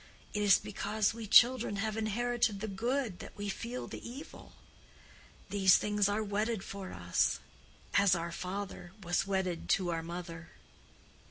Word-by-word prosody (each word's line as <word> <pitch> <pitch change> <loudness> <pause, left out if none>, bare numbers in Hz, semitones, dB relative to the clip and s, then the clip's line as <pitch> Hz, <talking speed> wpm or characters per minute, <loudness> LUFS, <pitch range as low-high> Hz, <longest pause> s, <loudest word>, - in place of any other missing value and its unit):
It 210 - -1
is 205 -2 +6
because 210 +1 -1
we 225 -1 -7
children 240 0 +6
have 215 +1 -2
inherited 225 0 0
the 220 - -3
good 230 0 -2
that - - -10
we 205 0 -3
feel 235 +5 -4
the - - -8
evil. 270 +6 -10 1.0
These 190 -2 +6
things 210 -1 +1
are 210 +2 0
wedded 210 0 -1
for 195 -1 -7
us, 90 0 +1 0.5
as 200 -2 +5
our 170 0 -3
father 185 0 -5
was 175 +2 0
wedded 190 -3 -1
to 180 -3 -2
our 165 -1 -1
mother." 170 0 -7
200 Hz, 150 wpm, -32 LUFS, 185-220 Hz, 1.0 s, is